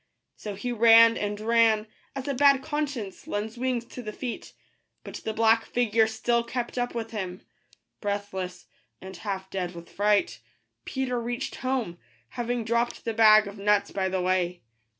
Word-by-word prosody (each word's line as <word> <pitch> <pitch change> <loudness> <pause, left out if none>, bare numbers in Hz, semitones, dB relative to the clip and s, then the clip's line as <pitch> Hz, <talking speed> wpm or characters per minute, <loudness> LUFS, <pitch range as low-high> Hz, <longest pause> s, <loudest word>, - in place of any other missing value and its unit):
So 210 -2 -7
he 245 +5 -4
ran 230 0 +7
and 205 0 -3
ran, 225 -1 +3 0.3
as 270 0 -5
a 280 - 0
bad 275 0 +4
conscience 285 -10 -4
lends 215 +3 -3
wings 245 -1 -1
to 250 - -9
the 215 -3 -6
feet; 240 +2 -6 0.5
but - - -7
the 220 - -2
black 225 +1 +3
figure 225 -2 +2
still 235 +2 0
kept 240 +1 -4
up 245 0 -2
with 225 0 -4
him. 185 -4 -5 0.6
Breathless, 200 -3 -4 0.3
and 190 0 -9
half 190 -2 -5
dead 180 -2 -3
with 170 0 -11
fright, 210 - +1 0.5
Peter 250 -2 -2
reached 240 +3 -4
home, 250 -10 -2 0.3
having 240 -1 -3
dropped 235 +1 -1
the 230 - -1
bag 215 -1 +7
of 200 0 -9
nuts 205 0 +2
by 190 -1 -1
the 185 0 -1
way. 180 -2 0
225 Hz, 165 wpm, -27 LUFS, 200-240 Hz, 0.6 s, ran